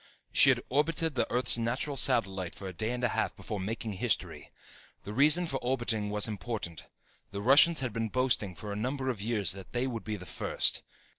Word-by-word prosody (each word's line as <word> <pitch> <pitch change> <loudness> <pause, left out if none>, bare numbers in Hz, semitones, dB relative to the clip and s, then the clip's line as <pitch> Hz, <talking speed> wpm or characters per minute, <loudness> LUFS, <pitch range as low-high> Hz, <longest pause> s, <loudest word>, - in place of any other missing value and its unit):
She - - +7
had - - +2
orbited 160 +4 0
the 130 - -1
Earth's 125 -1 +3
natural 125 +5 -2
satellite 95 -9 +1
for 95 - -8
a 95 - -6
day 110 +6 -2
and 125 0 -3
a 125 - +3
half - - -1
before 105 - -6
making 110 +2 -4
history. 95 - -2 0.5
The 105 - -7
reason 150 +8 +4
for 135 -5 -3
orbiting 120 -4 -1
was 105 +1 -1
important. 105 -5 -5 0.4
The 100 - -6
Russians 140 +9 +6
had 125 -5 -3
been 115 0 -2
boasting 120 -6 0
for 105 +4 -6
a - - -5
number 130 +5 -2
of 110 -5 -7
years 105 -4 +1
that 95 0 -8
they 125 +1 0
would 120 -4 -4
be 110 -1 -4
first. 90 -1 0
115 Hz, 200 wpm, -30 LUFS, 105-130 Hz, 0.5 s, She